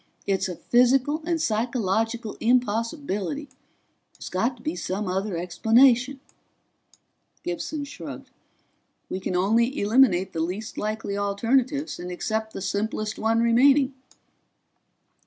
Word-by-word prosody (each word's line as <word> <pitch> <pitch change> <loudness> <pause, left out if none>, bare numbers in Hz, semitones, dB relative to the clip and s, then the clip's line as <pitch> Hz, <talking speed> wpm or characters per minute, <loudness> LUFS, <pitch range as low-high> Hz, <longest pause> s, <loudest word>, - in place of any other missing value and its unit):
It's 195 -1 0
a 180 - -4
physical 260 - +2
and 335 -2 +1
psychological 225 -2 -1
impossibility. 240 - 0 0.7
There's - - -8
got 230 +8 -1
to 235 - -18
be 310 - -2
some 195 +2 -3
other 190 0 -2
explanation." 240 +9 +3 1.2
Gibson 285 - -3
shrugged. 285 - -9 0.8
"We 185 - -2
can 185 - -3
only 230 +9 +2
eliminate 205 -4 +3
the 165 - -3
least 190 +8 -3
likely 215 -1 -3
alternatives 240 +9 0
and 175 +1 -6
accept 220 +4 -3
the - - -5
simplest 215 +1 -2
one 225 +1 +2
remaining." 265 +4 +4
225 Hz, 115 wpm, -25 LUFS, 200-255 Hz, 1.2 s, remaining